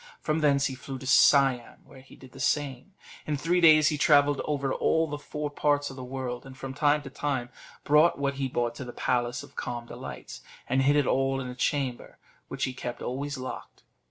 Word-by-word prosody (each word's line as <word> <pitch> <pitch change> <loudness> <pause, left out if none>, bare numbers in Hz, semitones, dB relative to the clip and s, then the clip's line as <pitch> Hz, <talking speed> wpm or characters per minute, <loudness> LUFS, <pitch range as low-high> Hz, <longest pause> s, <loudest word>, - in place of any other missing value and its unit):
From 155 0 -1
thence 140 -2 +3
he 140 - -1
flew 135 +1 -7
to 130 - -10
Siam, 130 -2 +3
where 130 - -15
he 130 - -17
did 130 -1 -15
the 135 - -13
same; 140 +5 -1 0.3
in 150 -1 -1
three 175 +5 +1
days 155 -3 +7
he 150 - -3
travelled 145 -1 +4
over 140 -2 -1
all 160 0 +2
the 145 -2 -5
four 150 0 -5
parts 145 -1 0
of - - -10
the 130 - -8
world, 125 -1 -5
and, 135 -1 -12
from 135 0 -6
time 150 0 +2
to 135 - -9
time, 135 -4 -2 0.3
brought 150 +4 +4
what 140 0 -1
he 135 - +1
bought 120 -2 -1
to 125 - -7
the 120 -1 -8
Palace 120 -1 -1
of - - -15
Calm 120 -1 -5
Delights, - - -9 0.3
and 130 +1 +2
hid 140 +2 +3
it 145 -2 +3
all 135 +1 +1
in 130 - -5
a - - -6
chamber, 130 -2 -2 0.3
which - - -5
he 130 - -1
kept 120 -1 -6
always 140 +3 -4
locked. 130 0 -8
135 Hz, 215 wpm, -27 LUFS, 130-145 Hz, 0.3 s, days